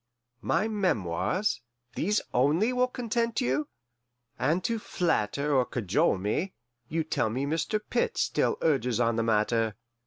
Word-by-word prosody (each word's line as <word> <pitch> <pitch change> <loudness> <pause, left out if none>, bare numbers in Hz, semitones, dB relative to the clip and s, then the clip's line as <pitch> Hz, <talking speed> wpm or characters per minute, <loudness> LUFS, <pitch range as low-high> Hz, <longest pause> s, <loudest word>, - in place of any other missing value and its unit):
My 215 - +1
memoirs 185 - 0 0.3
these 210 +5 +1
only 155 - +3
will 250 0 +2
content 235 -2 -1
you? 135 +5 0 0.7
And 160 +8 +1
to 230 -1 0
flatter 145 - 0
or 130 - +5
cajole 105 -5 +1
me, 105 - -1 0.4
you 165 +1 0
tell 120 -7 0
me 130 +5 -2
Mr. 165 +8 0
Pitt 475 -1 0
still - - +1
urges 125 -7 +2
on 115 -1 +2
the 115 - +1
matter. 110 0 +1
150 Hz, 135 wpm, -28 LUFS, -, 0.7 s, or